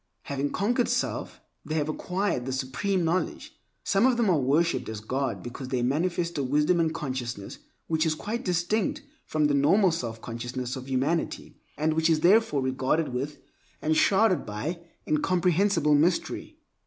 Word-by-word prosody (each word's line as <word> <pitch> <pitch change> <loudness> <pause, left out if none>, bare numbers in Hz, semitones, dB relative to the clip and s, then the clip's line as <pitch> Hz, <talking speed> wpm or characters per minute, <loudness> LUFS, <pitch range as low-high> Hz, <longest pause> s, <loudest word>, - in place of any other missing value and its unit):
Having 140 0 -2
conquered 240 - +1
self, - - -2 0.2
they 155 - -4
have 150 -2 0
acquired 180 -4 -2
the - - -2
Supreme 140 +9 -1
Knowledge. 175 +3 -2 0.3
Some 200 +5 +3
of 250 -2 +2
them 225 -5 +3
are 165 - +3
worshiped 150 +5 +1
as 110 -1 -5
God 130 +5 -2
because 120 +2 -7
they 125 -2 -1
manifest 170 +4 0
a - - 0
wisdom 150 +6 +2
and 165 -1 +3
a - - -6
consciousness 125 -7 -5 0.3
which 160 -1 +1
is 155 - +1
quite 225 +9 -4
distinct 180 +4 0 0.2
from 155 -1 +1
the 145 - +2
normal 170 +8 +4
self 115 -8 -4
consciousness 120 +2 -5
of 130 0 -8
humanity, 140 +6 -1 0.2
and 155 +1 +1
which 160 +1 +2
is 155 -1 +3
therefore 175 -6 +4
regarded 130 +5 0
with, 140 +4 -3 0.4
and 155 +1 +1
surrounded 195 +2 +3
by, 140 +12 -4 0.3
incomprehensible 175 0 +2
mystery. 165 +5 +1
155 Hz, 165 wpm, -27 LUFS, 130-180 Hz, 0.4 s, normal